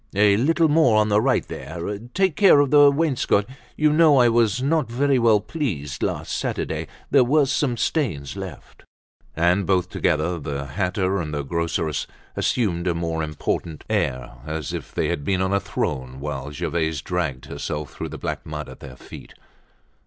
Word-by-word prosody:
"A 100 0 +5
little 160 +8 +3
more 145 -8 +4
on 105 0 +3
the 105 +1 +3
right 130 +2 +1
there. 85 +5 -5 0.2
Take 190 -5 +2
care 195 -8 +6
of 145 -2 +2
the 145 -1 +8
wainscot. 140 -8 +1 0.3
You 150 0 +3
know 155 -2 +5
I 120 -2 +6
was 115 -1 +2
not 145 -1 0
very 135 +2 +2
well 115 -3 +4
pleased 95 - -4
last - - -2
Saturday. - - -3 0.2
There 135 -3 +6
were 145 +4 +3
some 135 -2 0
stains 105 - -1
left." 95 -7 -9 0.5
And 85 +3 +2
both 90 -2 +1
together, 85 +1 0
the 70 -1 -4
hatter 95 +5 -1
and 75 -2 -5
the 75 -1 -2
groceress 80 0 -2 0.3
assumed 90 -7 0
a 85 - +1
more 85 -1 -2
important 75 +1 -3
air, 65 -1 -1
as 75 -1 -4
if - - -6
they - - -1
had 70 - -2
been 95 +4 0
on 95 +1 0
a 100 - +3
throne 65 -7 -3
whilst 75 0 -5
Gervaise 80 -3 -1
dragged 80 -8 -2
herself 75 -1 -5
through - - -5
the - - -7
black - - -4
mud - - -6
at - - -12
their 65 -3 -10
feet. - - -12
95 Hz, 175 wpm, -23 LUFS, 75-130 Hz, 0.5 s, the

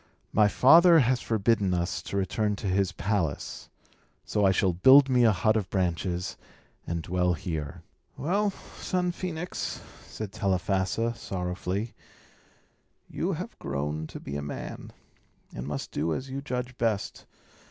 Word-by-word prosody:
My 105 -1 +5
father 165 - +7
has 130 -3 +3
forbidden 105 -4 +1
us 85 0 -2
to 100 - -4
return 105 +2 0
to 100 - -8
his 95 0 +1
palace; 85 -4 -2 0.6
so 105 - 0
I 95 - +6
shall 95 -1 +2
build 135 +9 +7
me 125 -2 +4
a 110 - +6
hut 110 +3 +2
of 105 -4 -1
branches, 90 -1 -1 0.5
and 85 -1 -2
dwell 90 +1 +1
here." 75 -2 -5 0.3
"Well, 200 +8 +1
son 180 -2 -3
Phœnix," 175 -1 -4 0.3
said 110 -3 -6
Telephassa, 95 +4 0
sorrowfully, 95 +2 -4 1.1
"you - - -2
have - - -6
grown 75 +3 -3
to - - -9
be 70 - -7
a 70 - -2
man, 70 0 -7 0.6
and 65 - -6
must 75 -1 -4
do 80 0 -1
as 130 0 -6
you 135 +1 -4
judge 125 -2 -4
best. 110 -4 -1
100 Hz, 140 wpm, -27 LUFS, 90-125 Hz, 1.1 s, father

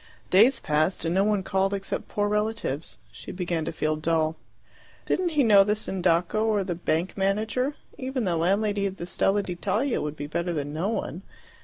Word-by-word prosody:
Days 235 +7 +6
passed, 155 +4 0
and 165 - 0
no 190 +2 +3
one 205 -2 +1
called 195 +1 +1
except 195 -1 -4
poor 205 0 -1
relatives. 210 - -2
She 105 - -9
began 175 -3 -2
to 165 - -2
feel 155 -1 -1
dull. 160 0 0 0.7
Didn't 360 -1 +1
he 285 - +6
know 205 -4 +7
the 210 +1 +1
Sindaco 185 0 +1
or 215 -3 +2
the 185 -2 -2
bank 170 +1 -1
manager? 215 +8 0 0.2
Even 260 -1 -2
the 180 -4 0
landlady 200 +4 +1
of 190 0 -6
the 170 - -5
Stella 195 +3 +1
d'Italia 215 +9 -1
would 150 0 -3
be 145 - -5
better 170 +4 -2
than 145 -2 -3
no 170 +6 -1
one. 180 -6 -3
190 Hz, 185 wpm, -26 LUFS, 165-210 Hz, 0.7 s, know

